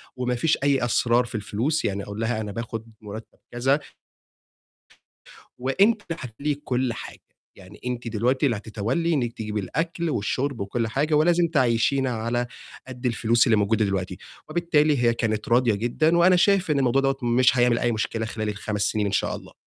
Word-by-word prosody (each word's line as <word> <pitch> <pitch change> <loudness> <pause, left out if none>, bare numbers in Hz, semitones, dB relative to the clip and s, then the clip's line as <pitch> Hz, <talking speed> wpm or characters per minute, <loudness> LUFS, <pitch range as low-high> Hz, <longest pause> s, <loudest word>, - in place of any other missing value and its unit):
وما 125 0 -1
فيش 160 +6 +1
أي 140 -3 +2
أسرار 120 +1 +2
في 120 0 -9
الفلوس، 115 +9 -1
يعني 100 0 -2
أقول 100 +1 -7
لها 115 0 -1
أنا 105 -1 -5
باخد 115 0 -5 0.2
مُرتب 110 +1 -10
كذا 130 +4 +1 1.8
وأنتِ 195 - +2
هتتوّلي 140 -1 -3
كُلّ 130 -3 -2
حاجة، - - -9 0.4
يعني 95 +2 -14
أنتِ 125 -1 -3
دلوقتي 120 +5 +1
اللي 120 -6 +1
هتتوّلي 115 +11 -1
إنِّك 120 -6 -1
تجيبي 105 -2 -4
الأكل 165 - -2
والشُرب 130 +2 -1
وكُلّ 115 +4 -2
حاجة، 145 +7 -1
ولازم 170 +3 +4
تعيّشينا 130 -2 +2
على 120 +1 -1 0.4
قد 125 -1 -9
الفلوس 120 0 +2
اللي 115 - +4
موجودة 105 +1 +2
دلوقتي، 95 -2 -2 0.3
وبالتالي 155 -6 +2
هي 120 -1 +4
كانت 110 -2 -2
راضية 120 -1 +4
جدًا، 140 +10 +1
وأنا 180 +2 +6
شايف 185 -2 +3
إن 145 - +2
الموضوع 135 0 +2
دوَّة 135 0 +1
مش 125 +2 +3
هيعمل 120 -1 +3
أي 120 - +1
مشكلة 110 0 -2
خلال 110 -1 -3
ال5 105 0 -4
سنين 105 +1 +1
إن 100 - -1
شاء 100 - 0
الله. - - -12
120 Hz, 170 wpm, -24 LUFS, 110-140 Hz, 1.8 s, وأنا